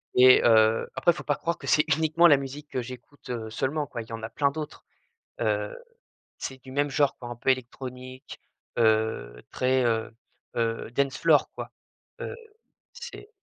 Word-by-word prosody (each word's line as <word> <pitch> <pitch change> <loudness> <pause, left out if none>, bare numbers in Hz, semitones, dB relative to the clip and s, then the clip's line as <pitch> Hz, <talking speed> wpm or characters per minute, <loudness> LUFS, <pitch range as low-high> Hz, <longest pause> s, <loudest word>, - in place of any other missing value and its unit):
et 130 0 +8
heu, 110 -1 +5
après 175 - +4
il 170 - -5
faut - - -7
pas 145 - +1
croire 170 +3 -2
que - - -10
c'est 150 - +5
uniquement 160 +2 +5
la 145 -3 +7
musique 140 +2 -7
que 130 - -2
j'écoute, 125 +3 -11
heu, 115 -3 -4
seulement 140 +7 -1
quoi 120 -4 -6
il 110 - -11
y 115 - -8
en 115 - -6
a 110 - -4
plein 140 +4 +1
d'autres. 150 +1 -7 0.6
Heu, - - 0 0.6
c'est 130 -1 -6
du 130 - -11
même 145 +2 +1
genre 140 0 +2
quoi 120 - -8
un 120 - -5
peu 120 +3 -2
électronique, 130 0 -4 0.4
heu, 110 - +1
très, 130 0 +2
heu 115 -1 0 0.4
heu, 115 -1 -1
dance 135 +1 0
floor - - +4
quoi, - - -7 0.5
heu, - - -4 0.6
c'est 475 -3 -9
130 Hz, 185 wpm, -27 LUFS, 115-145 Hz, 0.6 s, et